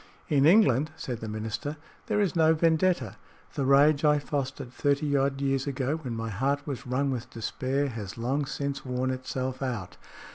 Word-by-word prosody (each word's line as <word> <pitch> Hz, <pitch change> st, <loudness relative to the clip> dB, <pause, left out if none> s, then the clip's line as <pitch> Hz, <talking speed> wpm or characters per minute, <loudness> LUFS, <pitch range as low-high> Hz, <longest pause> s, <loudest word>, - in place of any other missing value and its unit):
"In 145 Hz, -2 st, +4 dB
England," 155 Hz, -, +5 dB
said 130 Hz, -7 st, -5 dB
the 110 Hz, -, -5 dB
minister, 110 Hz, +8 st, -4 dB, 0.3 s
"there 210 Hz, -, +1 dB
is 200 Hz, -4 st, +1 dB
no 160 Hz, -1 st, +5 dB
vendetta. 160 Hz, -, +2 dB, 0.4 s
The 140 Hz, -, -1 dB
rage 140 Hz, +2 st, +5 dB
I 150 Hz, -1 st, +5 dB
fostered 135 Hz, -3 st, -4 dB
thirty 145 Hz, +1 st, +1 dB
odd 135 Hz, 0 st, +1 dB
years 135 Hz, 0 st, 0 dB
ago, 140 Hz, +2 st, -1 dB
when 130 Hz, -7 st, -5 dB
my 115 Hz, 0 st, -4 dB
heart 140 Hz, +7 st, 0 dB
was 135 Hz, -2 st, -5 dB
wrung 135 Hz, +2 st, 0 dB
with 125 Hz, -3 st, -4 dB
despair, 130 Hz, +5 st, -2 dB
has 110 Hz, -5 st, -7 dB
long 135 Hz, +5 st, -1 dB
since 140 Hz, -1 st, -3 dB
worn 130 Hz, 0 st, -1 dB
itself 130 Hz, 0 st, -4 dB
out. 120 Hz, -9 st, -4 dB
135 Hz, 175 wpm, -28 LUFS, 125-145 Hz, 0.4 s, England